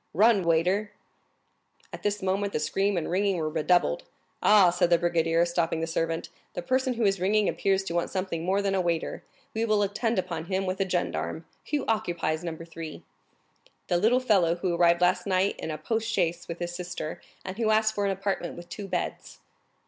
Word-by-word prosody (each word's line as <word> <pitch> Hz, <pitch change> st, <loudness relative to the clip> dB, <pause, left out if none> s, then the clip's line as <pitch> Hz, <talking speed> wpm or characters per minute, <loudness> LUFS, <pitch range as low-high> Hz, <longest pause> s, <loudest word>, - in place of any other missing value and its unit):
"Run, 210 Hz, +1 st, +5 dB
waiter!" 180 Hz, +6 st, +1 dB, 1.0 s
At -, -, -7 dB
this 205 Hz, -1 st, -1 dB
moment 195 Hz, +2 st, 0 dB
the -, -, 0 dB
screams 195 Hz, +5 st, 0 dB
and 165 Hz, -, -1 dB
ringing 195 Hz, +1 st, +1 dB
were 155 Hz, -2 st, -1 dB
redoubled. 160 Hz, -, +2 dB, 0.4 s
"Aha!" 200 Hz, -4 st, +6 dB
said 175 Hz, 0 st, +2 dB
the 170 Hz, -, +5 dB
brigadier, 170 Hz, 0 st, +2 dB
stopping 170 Hz, -1 st, 0 dB
the 165 Hz, -, -1 dB
servant, 165 Hz, 0 st, -2 dB, 0.3 s
"the 175 Hz, -, -3 dB
person 260 Hz, +4 st, +1 dB
who 230 Hz, -, -1 dB
is 195 Hz, -2 st, +2 dB
ringing 205 Hz, +2 st, +3 dB
appears 195 Hz, -1 st, +1 dB
to 170 Hz, -, -5 dB
want 170 Hz, 0 st, 0 dB
something 185 Hz, -4 st, -3 dB
more 195 Hz, +3 st, +1 dB
than 195 Hz, -1 st, +1 dB
a 190 Hz, -, +2 dB
waiter; 170 Hz, -2 st, -2 dB, 0.3 s
we 225 Hz, -, -1 dB
will 215 Hz, -2 st, +2 dB
attend 220 Hz, +3 st, -1 dB
upon 175 Hz, -3 st, -2 dB
him 190 Hz, +2 st, -1 dB
with 185 Hz, 0 st, -2 dB
a 190 Hz, -, 0 dB
gendarme. 85 Hz, -, -2 dB, 0.2 s
Who 290 Hz, -2 st, 0 dB
occupies 175 Hz, -7 st, -1 dB
Number 165 Hz, -1 st, -5 dB
3?" 165 Hz, -2 st, -8 dB, 0.9 s
"The 175 Hz, -, +3 dB
little 225 Hz, +7 st, +4 dB
fellow 195 Hz, -9 st, +3 dB
who 175 Hz, 0 st, -1 dB
arrived 170 Hz, 0 st, +4 dB
last 180 Hz, +3 st, +2 dB
night 190 Hz, +1 st, +2 dB
in -, -, -4 dB
a 155 Hz, -, -3 dB
post 225 Hz, +8 st, -2 dB
chaise 175 Hz, -4 st, 0 dB
with 170 Hz, -, -5 dB
his 175 Hz, 0 st, -4 dB
sister, 175 Hz, -3 st, -5 dB, 0.2 s
and 190 Hz, +4 st, -6 dB
who 225 Hz, -2 st, +2 dB
asked 215 Hz, 0 st, +3 dB
for 205 Hz, -, -1 dB
an 200 Hz, -, +1 dB
apartment 195 Hz, -3 st, -3 dB
with 175 Hz, 0 st, -10 dB
two 200 Hz, +1 st, -6 dB
beds." -, -, -4 dB
185 Hz, 200 wpm, -27 LUFS, 170-205 Hz, 1.0 s, Aha